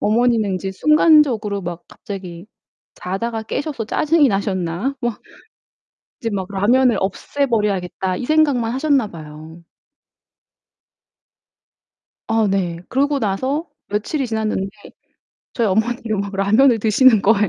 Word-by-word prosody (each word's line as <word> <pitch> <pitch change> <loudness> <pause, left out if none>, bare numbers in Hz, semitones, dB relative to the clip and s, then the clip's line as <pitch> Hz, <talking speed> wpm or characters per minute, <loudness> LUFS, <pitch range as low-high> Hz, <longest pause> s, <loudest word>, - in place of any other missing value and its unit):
어머니는 220 -2 +2
이제 190 +1 -4
순간적으로 275 - +3
막 175 0 -6
갑자기 185 -2 -9 0.5
자다가 220 +5 -4
깨셔서 275 +1 -4
짜증이 295 +5 +2
나셨나? 195 +4 -2
막 240 -3 -3 1.0
이제 230 - -2
막 190 -2 -2
'라면을 235 +5 +3
없애버려야겠다.' 200 -4 -1
이 245 - -5
생각만 285 -7 +2
하셨나 270 -3 +1
봐요. 155 0 -11 2.7
아 225 -2 +2
네. 180 -4 -1
그러고 280 +1 +1
나서 260 - -1 0.2
며칠이 215 +8 -2
지났는데 215 -3 -2 0.8
저희 235 - 0
어머니가 220 +2 -1
막 200 0 -4
라면을 220 +6 +4
드시는 220 +1 +4
거예요. 210 -1 +3
220 Hz, 275 characters per minute, -19 LUFS, 195-260 Hz, 2.7 s, 라면을